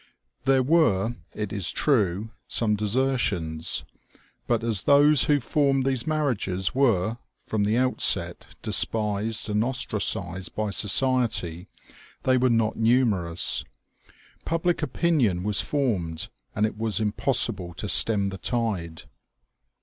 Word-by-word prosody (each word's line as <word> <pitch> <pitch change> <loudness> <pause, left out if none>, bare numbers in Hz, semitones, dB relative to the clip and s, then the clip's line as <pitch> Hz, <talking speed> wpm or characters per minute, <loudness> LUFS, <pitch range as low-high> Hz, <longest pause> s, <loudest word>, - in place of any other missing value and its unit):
There 135 -1 +3
were, 120 - +2 0.2
it 105 -2 -4
is 100 -5 -1
true, 110 - 0 0.2
some 105 -2 +1
desertions; 105 -8 -1 0.6
but, 120 -1 0
as 110 -4 -1
those 145 +1 +5
who 145 -1 +2
formed 135 +2 0
these 130 -1 -1
marriages 120 -12 -1
were, 115 -4 +1 0.2
from 105 -2 -2
the 110 +3 +1
outset, 130 0 +1 0.2
despised 110 +1 0
and 105 0 0
ostracized 100 -7 -3
by 105 -1 -2
society, 105 -6 +1 0.6
they 130 -1 +2
were 130 +1 +2
not 115 -2 0
numerous. 110 -8 +1 0.8
Public 165 0 -1
opinion 135 - 0
was 105 0 +1
formed, 95 - -2 0.3
and 105 - +1
it 110 0 -5
was 110 -2 0
impossible 95 -4 +1
to 105 - -5
stem 100 +1 +4
the 95 -1 -8
tide. 95 -8 -3
110 Hz, 120 wpm, -25 LUFS, 100-130 Hz, 0.8 s, those